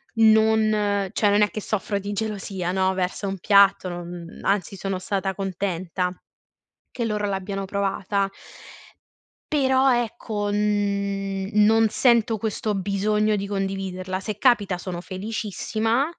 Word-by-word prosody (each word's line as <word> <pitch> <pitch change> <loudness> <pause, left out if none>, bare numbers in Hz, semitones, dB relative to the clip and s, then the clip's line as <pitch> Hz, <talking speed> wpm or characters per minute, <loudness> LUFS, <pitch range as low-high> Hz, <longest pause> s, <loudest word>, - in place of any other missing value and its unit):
non 215 -2 +3
cioè 210 - +2
non 205 +1 +4
è 210 - +1
che 215 - -4
soffro 205 0 -2
di 200 +1 -5
gelosia, 195 -4 -3
no, 190 0 +1
verso 185 +2 -2
un 195 0 -3
piatto, 200 0 +4
non 175 -1 -8
anzi 200 0 0
sono 195 0 -3
stata 190 0 -2
contenta 185 -2 -2 0.8
che 235 - -3
loro 210 -2 -1
l'abbiano 195 0 -3
provata. 200 0 -1 1.2
Però 265 -2 +4
ecco, 220 -3 -2
n 200 -2 -1
non 220 +1 +5
sento 235 0 +3
questo 215 0 -2
bisogno 210 +2 +1
di 200 0 -3
condividerla. 190 -2 -3
Se 210 +1 -5
capita 210 -6 +3
sono 180 -1 -5
felicissima, 215 +5 -2
200 Hz, 125 wpm, -24 LUFS, 190-215 Hz, 1.2 s, non